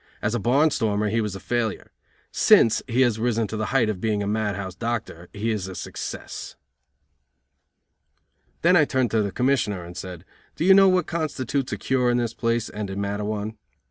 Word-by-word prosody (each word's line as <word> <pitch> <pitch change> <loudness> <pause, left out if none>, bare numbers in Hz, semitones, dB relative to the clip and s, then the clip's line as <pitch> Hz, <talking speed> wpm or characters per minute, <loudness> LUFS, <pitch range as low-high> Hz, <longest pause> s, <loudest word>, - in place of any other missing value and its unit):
As 105 - -1
a 120 - 0
barn 140 +9 +3
stormer 105 -5 0
he 115 +2 +1
was 105 -3 -3
a - - -6
failure. 115 +2 -2 0.4
Since 115 - +5
he 125 +1 +1
has 120 -4 +2
risen 115 -1 +1
to - - -4
the 110 0 -2
height 125 -3 +2
of 105 -4 -3
being 105 -2 0
a - - -3
mad 105 -1 -1
house 95 -1 -5
doctor 110 -6 -4
he 110 +2 -2
is 100 -4 -2
a 95 - -7
success." - - -7 2.1
Then 180 +2 +5
I 160 - +6
turned 130 -5 0
to 110 - +2
the 100 -1 -2
Commissioner 125 -8 0
and 85 +1 -10
said: 90 -1 -8 0.3
"Do 165 - -1
you 190 - +8
know 195 0 +7
what 185 -1 +2
constitutes 145 -5 -2
a - - -2
cure 130 -2 +1
in 120 - +2
this 120 -2 -1
place 115 -1 -1
and 105 -1 -5
in 95 +1 -4
Matteawan?" 105 +2 -3
110 Hz, 200 wpm, -24 LUFS, 105-125 Hz, 2.1 s, you